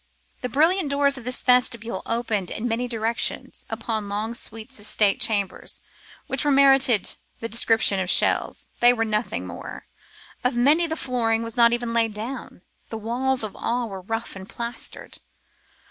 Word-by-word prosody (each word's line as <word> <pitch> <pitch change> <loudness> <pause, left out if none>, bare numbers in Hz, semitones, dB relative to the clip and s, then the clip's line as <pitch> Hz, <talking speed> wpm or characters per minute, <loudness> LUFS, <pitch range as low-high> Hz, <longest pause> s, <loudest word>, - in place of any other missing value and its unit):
The 250 - -3
brilliant 320 - +2
doors 280 0 +2
of 240 - -13
this 250 +1 -1
vestibule 240 -2 +2
opened 225 -5 -1
in 225 +3 -3
many 240 +2 -1
directions 230 0 -2
upon 220 -4 -3
long 215 +3 -3
suites 225 +1 -4
of 210 - -5
state 205 -2 +2
chambers, 210 -4 -1 0.5
which 265 +1 -1
indeed 290 -2 +2
merited 270 -6 +5 0.2
the 230 - -3
description 225 -3 +3
of 185 -1 -2
shells. - - +1
They 240 0 +6
were 225 -2 -1
nothing 215 +1 -2
more; - - -9 0.6
of 250 0 +1
many 295 +8 +4
the 320 - -3
flooring 230 -4 0
was 230 -1 -4
not 235 -1 +5
even 240 -1 -2
laid 225 -2 +1
down; 225 -3 -7 0.3
the 225 - -5
walls 250 +3 +1
of 215 - -5
all 240 0 -2
were 195 -1 -7
rough 225 +4 -5
and 190 +1 -10
plastered. 235 +1 -6
235 Hz, 165 wpm, -23 LUFS, 220-250 Hz, 0.6 s, They